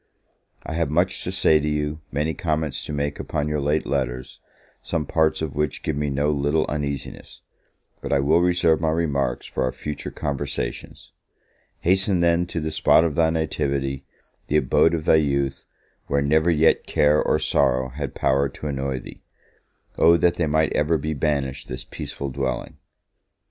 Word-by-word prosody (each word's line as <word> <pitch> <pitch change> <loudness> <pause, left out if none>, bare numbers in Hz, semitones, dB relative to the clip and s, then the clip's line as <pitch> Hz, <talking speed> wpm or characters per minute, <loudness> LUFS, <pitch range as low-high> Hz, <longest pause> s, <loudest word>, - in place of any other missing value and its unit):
I - - -4
have 80 -2 0
much 85 +5 +1
to - - -2
say 80 - +4
to 75 - -2
you, 75 +1 -2
many 75 +3 -1
comments 80 -4 -2
to - - -6
make 70 0 -2
upon 75 0 -2
your 75 0 -1
late 75 +2 0
letters, 65 -3 -3 0.4
some 80 -3 -2
parts 80 +2 +1
of 75 -4 -3
which 75 0 -2
give 80 - -1
me 75 0 -1
no 70 +2 +1
little 75 +2 +1
uneasiness; 70 -2 -5 0.6
but - - -5
I 70 - +3
will 80 +5 +3
reserve 85 -2 +2
my 80 - +1
remarks 70 -6 -1
for - - -4
our 65 -1 +1
future 75 +2 -6
conversations. 70 -1 -5 0.7
Hasten, 95 +1 +2
then, 85 +1 +2
to 85 - -3
the 80 0 -3
spot 80 +1 +4
of 85 -3 0
thy 80 0 +3
nativity, 70 -4 -1 0.4
the 75 - +2
abode 80 +4 +3
of 80 -2 -4
thy - - +5
youth, 70 -3 0 0.4
where 70 0 +1
never 80 +4 +3
yet 80 -1 +3
care 75 +1 +3
or - - +2
sorrow 65 +1 +1
had 70 +1 -6
power 70 +1 +1
to 70 - -10
annoy 70 -2 -2
thee. - - -12 0.8
O 85 +1 +6
that 85 0 +3
they 85 -2 -1
might 80 +1 +1
ever 75 +2 +2
be 80 +2 -3
banished 70 -2 -2
this 65 +1 -6
peaceful 70 - -6
dwelling! 65 -1 -3
75 Hz, 175 wpm, -23 LUFS, 70-80 Hz, 0.8 s, O